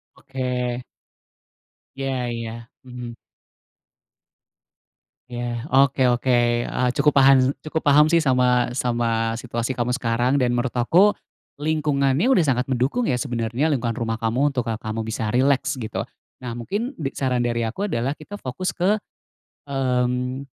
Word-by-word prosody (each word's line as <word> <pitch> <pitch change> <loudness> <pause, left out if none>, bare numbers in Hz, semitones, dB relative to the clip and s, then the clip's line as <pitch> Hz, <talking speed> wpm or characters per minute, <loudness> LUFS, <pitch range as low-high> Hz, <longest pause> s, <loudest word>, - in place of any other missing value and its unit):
Oke. 125 -2 -3 1.2
Ya 135 -2 -2
ya, 115 0 -6 0.2
mhm. 125 -2 -8 2.1
Ya, 120 0 -4
oke 135 -1 +4
oke, 120 +2 -2 0.4
eee, 125 0 0
cukup 150 +1 +2
paham 135 -1 +6 0.2
cukup 155 +1 -2
paham 145 +1 +5
sih 165 +2 +3
sama 125 -3 +2
sama 115 -2 0
situasi 120 +1 -3
kamu 120 -1 -2
sekarang. 120 +2 +1
Dan 125 -3 +1
menurut 120 +1 0
aku, 180 +12 +4 0.4
lingkungannya 150 - +1
sudah 185 -11 +4
sangat 125 -2 +1
mendukung, 135 - 0
ya, 125 - +1
sebenarnya 125 +3 -1
lingkungan 120 -3 -2
rumah 115 -1 -3
kamu 125 +6 +1
untuk, 125 -3 -2
eee, 110 - -1
kamu 110 0 -4
bisa 110 -1 -3
rileks 135 +2 +1
gitu. 110 - -4 0.4
Nah, 120 - -4
mungkin 205 - -3
dik 135 -2 -4
saran 130 -2 0
dari 120 -1 0
aku 195 - -3
adalah 125 -1 -1
kita 155 +7 -10
fokus 135 +4 -4
ke, 200 +4 +1 0.7
mmm, 125 -1 -1
125 Hz, 135 wpm, -23 LUFS, 120-140 Hz, 2.1 s, paham